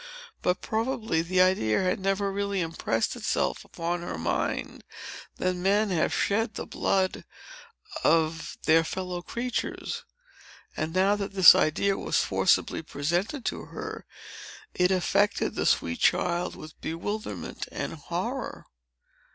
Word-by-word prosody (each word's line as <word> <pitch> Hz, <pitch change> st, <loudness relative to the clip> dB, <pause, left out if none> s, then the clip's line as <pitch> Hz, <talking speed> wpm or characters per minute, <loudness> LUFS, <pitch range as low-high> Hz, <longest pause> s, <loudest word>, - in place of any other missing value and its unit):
But, 180 Hz, +1 st, 0 dB
probably, 220 Hz, -6 st, 0 dB
the 180 Hz, +2 st, +2 dB
idea 185 Hz, -, +3 dB
had 185 Hz, +1 st, +1 dB
never 195 Hz, +1 st, 0 dB
really 200 Hz, 0 st, -1 dB
impressed 160 Hz, -9 st, -1 dB
itself -, -, -1 dB
upon 170 Hz, +1 st, -3 dB
her 170 Hz, -, -5 dB
mind, 80 Hz, -, -2 dB, 0.5 s
that 185 Hz, 0 st, 0 dB
men 200 Hz, +3 st, +2 dB
have 165 Hz, -3 st, +1 dB
shed 215 Hz, +1 st, 0 dB
the -, -, -4 dB
blood 190 Hz, -1 st, 0 dB, 0.8 s
of 160 Hz, 0 st, +1 dB
their 165 Hz, +1 st, +5 dB
fellow 180 Hz, +1 st, -4 dB
creatures. 240 Hz, +6 st, -3 dB, 0.7 s
And 155 Hz, +1 st, -2 dB
now 190 Hz, +3 st, +3 dB
that 200 Hz, -1 st, -4 dB
this 190 Hz, -3 st, +10 dB
idea 195 Hz, +5 st, +1 dB
was -, -, 0 dB
forcibly -, -, +2 dB
presented 175 Hz, -, -2 dB
to -, -, -3 dB
her, -, -, -7 dB, 0.7 s
it 180 Hz, 0 st, +3 dB
affected 190 Hz, +2 st, +1 dB
the -, -, 0 dB
sweet 85 Hz, 0 st, +1 dB
child 175 Hz, 0 st, +1 dB
with 155 Hz, 0 st, -12 dB
bewilderment 165 Hz, -, -4 dB
and -, -, -4 dB
horror. -, -, -4 dB
185 Hz, 125 wpm, -27 LUFS, 165-200 Hz, 0.8 s, this